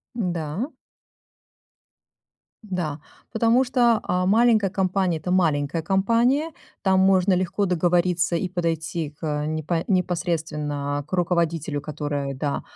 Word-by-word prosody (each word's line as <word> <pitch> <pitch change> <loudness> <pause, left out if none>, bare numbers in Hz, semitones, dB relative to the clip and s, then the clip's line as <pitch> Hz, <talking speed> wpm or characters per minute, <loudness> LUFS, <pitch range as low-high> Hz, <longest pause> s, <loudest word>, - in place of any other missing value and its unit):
Да. 175 - -2 2.0
Да. 160 -5 -3 0.3
Потому 230 +3 +3
что, 240 -3 +3
а, 180 0 0
маленькая 220 -1 +4
компания- 185 -2 0
это 155 +4 -5
маленькая 160 -3 +1
компания. 230 - +2 0.3
Там 190 -1 +3
можно 190 0 +4
легко 185 +2 0
договориться 175 0 +1
и 180 +2 -2
подойти 165 -3 -2
к 150 0 -3
непо 155 +2 -2
непосредственно 155 -6 -1
к - - -25
руководителю, 170 -4 0
которая, 145 -2 -4
да 140 +2 -2
175 Hz, 110 wpm, -24 LUFS, 155-190 Hz, 2.0 s, маленькая